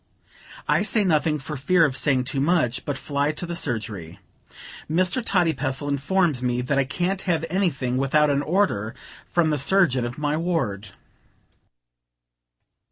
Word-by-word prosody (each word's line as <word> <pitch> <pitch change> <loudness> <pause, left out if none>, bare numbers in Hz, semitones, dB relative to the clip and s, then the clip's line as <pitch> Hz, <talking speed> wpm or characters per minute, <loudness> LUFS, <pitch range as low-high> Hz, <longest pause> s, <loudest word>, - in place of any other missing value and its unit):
I - - +3
say 215 - +2
nothing, 155 -4 +2
for 150 +2 -7
fear 165 +5 +3
of 135 -4 -1
saying 135 -2 +2
too 135 +1 -2
much, 140 -6 +1
but 145 -2 -2
fly 145 +1 -1
to 165 - -5
the 170 0 -4
surgery. 105 - -4 0.7
Mr. 180 +8 +1
Toddypestle 150 - 0
informs 145 +1 +1
me 125 -1 0
that 135 +3 0
I 135 - +2
can't 180 +7 -2
have 165 -2 +1
anything 140 -10 0
without 145 +3 +3
an 140 0 +1
order 150 - 0 0.3
from 165 -3 +2
the 150 - 0
surgeon 140 -4 +3
of 120 +1 -5
my 150 0 -1
ward. 155 - -2
145 Hz, 150 wpm, -24 LUFS, 130-175 Hz, 0.7 s, I